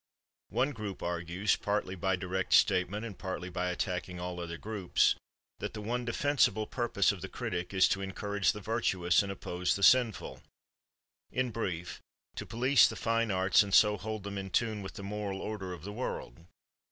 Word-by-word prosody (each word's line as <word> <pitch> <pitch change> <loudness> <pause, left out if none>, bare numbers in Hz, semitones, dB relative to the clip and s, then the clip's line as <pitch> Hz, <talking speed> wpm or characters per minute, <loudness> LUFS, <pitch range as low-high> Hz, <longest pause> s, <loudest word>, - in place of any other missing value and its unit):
One 135 +4 +1
group 105 -7 -6
argues, 85 +3 0
partly 100 -2 -1
by 95 0 0
direct 95 0 -2
statement 100 +5 +3
and 105 -4 -7
partly 90 -1 -5
by 90 0 -1
attacking 90 0 -3
all 90 0 -4
other 85 -1 -5
groups, 105 -3 +2 0.5
that - - -5
the 105 - -5
one 120 +3 -2
defensible 125 -3 +2
purpose 115 -5 +1
of 100 -4 -7
the 95 - -6
critic 90 0 -4
is 95 -1 +5
to 100 - 0
encourage 100 +1 0
the 105 - -8
virtuous 95 -5 +2
and 100 -1 -4
oppose 90 -2 -1
the 100 - -3
sinful—in 125 +1 -1
brief, 90 -7 -4 0.3
to - - -6
police 125 +1 +5
the - - -5
fine 115 0 0
arts 95 -1 +4
and 100 -2 +1
so 105 -1 +6
hold 110 0 -5
them 100 0 -4
in 95 0 -5
tune 110 +1 0
with 95 - -8
the 100 - -7
moral 100 -1 -4
order 100 -4 -5
of 85 -3 -8
the 105 +2 -6
world. 85 - -5
100 Hz, 175 wpm, -31 LUFS, 90-110 Hz, 0.5 s, so